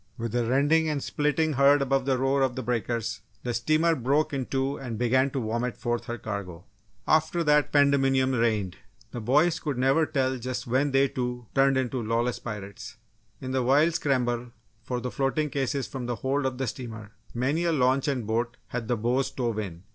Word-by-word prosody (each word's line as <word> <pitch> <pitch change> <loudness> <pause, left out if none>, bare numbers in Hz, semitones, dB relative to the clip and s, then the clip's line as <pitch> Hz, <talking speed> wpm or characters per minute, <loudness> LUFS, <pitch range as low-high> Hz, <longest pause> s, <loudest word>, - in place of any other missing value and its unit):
With 115 -2 -4
a 120 0 +1
rending 145 +6 +2
and 145 -3 -2
splitting 150 +1 0
heard 140 +2 +5
above 135 -1 +1
the 135 -1 +1
roar 135 +2 +1
of 130 -2 +1
the 130 - -4
breakers, 115 -1 -2 0.2
the 120 - -2
steamer 155 +8 +2
broke 140 +4 +1
in 135 -3 -2
two 135 +1 -1
and 120 -4 -5
began 130 +3 +2
to 135 - -3
vomit 115 +2 -2
forth 120 0 -2
her 120 -2 -4
cargo. 100 -6 -6 0.4
After 160 +2 +2
that 150 -1 +3
pandemonium 135 -2 +3
reigned. 110 -7 0 0.3
The 120 - -5
boys 150 +9 +3
could 145 -5 -3
never 135 +5 +3
tell 130 -3 0
just 125 +1 -4
when 130 +4 +1
they, 135 0 +3
too, 125 -2 -4
turned 135 0 +3
into 130 -1 -1
lawless 115 +2 -1
pirates! 110 +1 -8 0.4
In 130 - -4
the 130 0 +1
wild 145 +7 +3
scramble 125 -5 0 0.3
for 125 +2 -3
the 125 0 -4
floating 140 +2 -1
cases 135 -2 -1
from 125 +2 -6
the 120 - -1
hold 135 +3 -1
of 130 -1 -4
the 135 - -1
steamer, 115 -3 -7 0.2
many 140 +8 0
a 170 - +2
launch 135 -2 +2
and 130 -5 -1
boat 115 +2 -1
had 120 -2 -4
the 120 - 0
bows 125 +5 +1
stove 120 -4 -2
in. 90 -4 -6
130 Hz, 195 wpm, -27 LUFS, 120-140 Hz, 0.4 s, heard